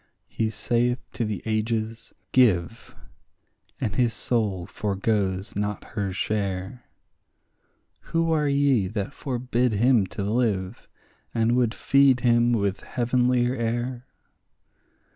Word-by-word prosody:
He 110 -1 -1
saith 120 +2 0 0.2
to - - -2
the 105 -3 -4
ages, 110 +1 -2 0.2
Give; 115 -4 +2 0.8
and 105 - -2
his 120 -3 +1
soul 105 -7 -1
foregoes 100 -1 -1
not 105 0 -2
her 100 -3 -2
share; 100 +3 -3 1.2
Who 165 0 0
are 150 -2 +2
ye 140 -7 +2
that 105 +5 -4
forbid 125 -3 -1
him 115 -1 +3
to 100 - -5
live, 105 -2 -1 0.5
and 115 +1 +2
would 120 -2 +1
feed 140 -2 +4
him 120 0 +3
with 100 -4 0
heavenlier 125 0 +1
air? 120 +1 -3
115 Hz, 110 wpm, -25 LUFS, 105-125 Hz, 1.2 s, feed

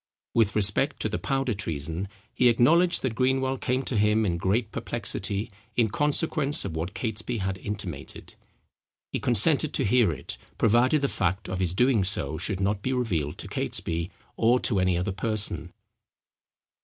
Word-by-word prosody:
With 110 -2 +2
respect 105 +8 +2
to 110 - 0
the 105 - -3
Powder 135 -3 -1
Treason 85 -1 -4 0.3
he 125 - +4
acknowledged, 165 +10 +3
that 130 -4 0
Greenwell 130 +2 +1
came 130 +2 0
to 125 - -3
him 105 +1 +3
in 85 -4 0
great 105 +5 0
perplexity 105 -2 -3 0.2
in 115 -3 +3
consequence 150 +2 0
of 85 -5 -4
what 85 +6 -4
Catesby 115 +1 -3
had 95 -2 -3
intimated. 95 -10 -7 0.8
He - - -2
consented - - +3
to - - 0
hear 110 -2 +4
it, 75 - -7 0.2
provided 120 +6 +3
the - - +3
fact 95 -4 -1
of 90 0 -3
his 90 -1 -1
doing 125 -2 +3
so 80 -6 -1
should 100 -3 -3
not 100 +1 0
be 130 +5 -1
revealed 90 - -1
to - - -7
Catesby, 85 +1 -1 0.3
or 120 +2 +4
to 100 -5 +2
any 90 -1 +2
other 90 +2 -1
person. 105 +2 -2
105 Hz, 165 wpm, -26 LUFS, 95-125 Hz, 0.8 s, he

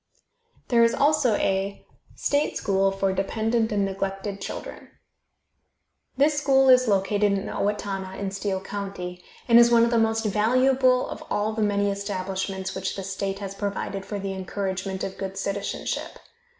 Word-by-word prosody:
There 235 -2 +5
is 230 - +3
also 285 -6 +3
a 195 0 -1 0.3
STATE 285 +1 0
SCHOOL 195 0 +1
FOR 195 0 0
DEPENDENT 220 +4 0
AND 200 -1 +1
NEGLECTED 195 +1 -4
CHILDREN. - - -7 1.3
This 290 +2 +3
school 270 -2 +4
is 255 -1 +6
located 200 0 +2
at 195 - -4
Owatonna, 195 -2 -3
in 200 -1 -3
Steele 195 -1 -2
county, 195 -3 -6 0.2
and 235 -1 +7
is 235 0 +7
one 235 -1 +5
of 235 - -1
the 235 - +3
most 225 0 +1
valuable 255 +4 +3
of - - -7
all 210 +1 0
the 220 - -2
many 205 -1 +1
establishments 190 -1 -3
which 190 0 -3
the 195 - -5
state 195 0 -3
has 195 -1 -6
provided 200 -1 -3
for 205 - -5
the 195 -1 -4
encouragement 190 0 -3
of 190 - -5
good 195 0 -5
citizenship. 195 +1 -3
200 Hz, 155 wpm, -25 LUFS, 195-225 Hz, 1.3 s, and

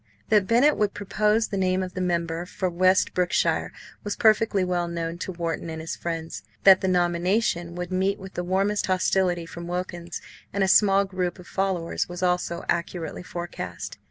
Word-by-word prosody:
That 210 -4 +4
Bennett 255 +6 +4
would 210 -1 0
propose 210 +2 +1
the 200 - -2
name 185 0 +1
of 180 -1 -6
the 185 - -3
member 170 -1 -1
for 185 0 -2
West 185 +2 +3
Brookshire 180 -1 +1 0.3
was 205 - -3
perfectly 215 -2 +3
well 175 -1 0
known 170 0 -4
to 190 - -4
Wharton 170 -1 -3
and 160 0 -5
his 160 +1 -4
friends. 165 -1 -5 0.2
That 190 -1 +8
the 190 - 0
nomination 175 0 +1
would 180 0 -5
meet 190 +2 +1
with 190 0 -10
the 175 - -3
warmest 195 +3 0
hostility 185 -2 +1
from 170 +1 -8
Wilkins 175 -1 -4 0.3
and 200 - 0
a - - +2
small 200 0 +5
group 185 -2 -3
of 180 - -12
followers 190 -4 -1
was 175 +1 -5
also 180 -1 0
accurately 170 0 -2
forecast. 175 - -6
180 Hz, 180 wpm, -25 LUFS, 170-195 Hz, 0.3 s, That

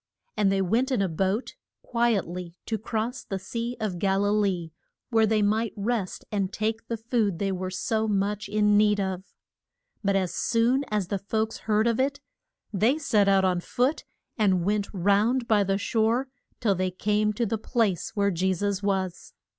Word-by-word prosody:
And 200 -2 +2
they 195 0 +2
went 235 +9 +1
in 255 - +1
a 195 - +2
boat 190 +7 -1 0.3
quiet 235 -4 +1
ly 175 0 -7
to 220 -2 -2
cross 230 +4 -3
the 195 - -4
Sea 230 +5 -4
of 200 -5 -2
Gal 195 +1 +2
i - - +2
lee, 195 -6 0 0.4
where 225 -1 +4
they 215 -1 +2
might 220 +2 +1
rest 205 -2 -2
and 200 -2 -1
take 220 +2 -2
the 230 - -2
food 220 -5 0
they 195 +2 -1
were 185 0 -3
so 220 +4 -1
much 205 +1 -1
in 210 0 +3
need 210 -1 +4
of. 190 -1 -3 0.7
But 200 -1 +2
as 185 -3 0
soon 240 +8 +2
as 205 -4 -1
the 200 - -1
folks 220 +3 -2
heard 215 +1 +3
of 230 0 +1
it 280 +2 0 0.5
they 225 +9 +3
set 220 -10 +2
out 195 -1 +4
on 180 -1 +2
foot 250 - 0 0.4
and 185 -5 +3
went 205 0 0
round 210 +6 +2
by 210 -2 +4
the 195 0 0
shore 230 +5 +1 0.3
till 210 -4 +2
they 185 0 0
came 210 +3 +1
to 235 +3 0
the 220 0 -2
place 220 -5 -1
where 200 -1 +2
Je 185 +2 +1
sus 200 +1 -1
was. 190 -3 -2
205 Hz, 185 wpm, -26 LUFS, 195-225 Hz, 0.7 s, where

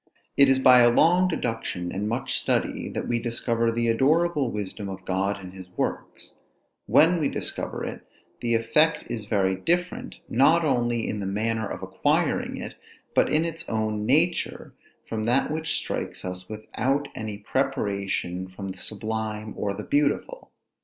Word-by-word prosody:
It 140 -1 +7
is 135 - +5
by 130 -1 +7
a 120 0 +7
long 175 +9 +4
deduction, 115 - -3
and 105 +2 -2
much 120 +3 -2
study, - - 0
that - - -4
we 120 -1 +1
discover 115 0 0
the 115 0 0
adorable 145 +4 +2
wisdom 105 -1 -5
of 95 0 -8
God 95 +2 0
in 90 -1 -9
his 95 -1 -11
works: - - -4 0.5
when 165 +3 +5
we 145 - +1
discover - - -4
it - - -6 0.4
the 115 -1 +1
effect 150 +8 +3
is 110 -3 -4
very 100 -3 +1
different, 175 - -1
not 155 +7 +4
only 120 -4 +1
in 105 - -3
the 100 - -3
manner 110 +2 -1
of - - -6
acquiring - - 0
it, - - -6 0.4
but - - +3
in 155 +2 +3
its 165 0 -5
own 110 -1 -1
nature, 160 +7 +1 0.3
from 110 -1 -3
that 125 +5 +2
which 160 +1 -1
strikes - - -4
us 90 0 -6
without 130 +6 -1
any 110 -2 -5
preparation 100 -5 -2
from 95 +1 -7
the 95 0 -7
sublime 110 0 -3
or 100 -1 -2
the 105 - -6
beautiful. 145 - 0
115 Hz, 160 wpm, -25 LUFS, 100-140 Hz, 0.5 s, It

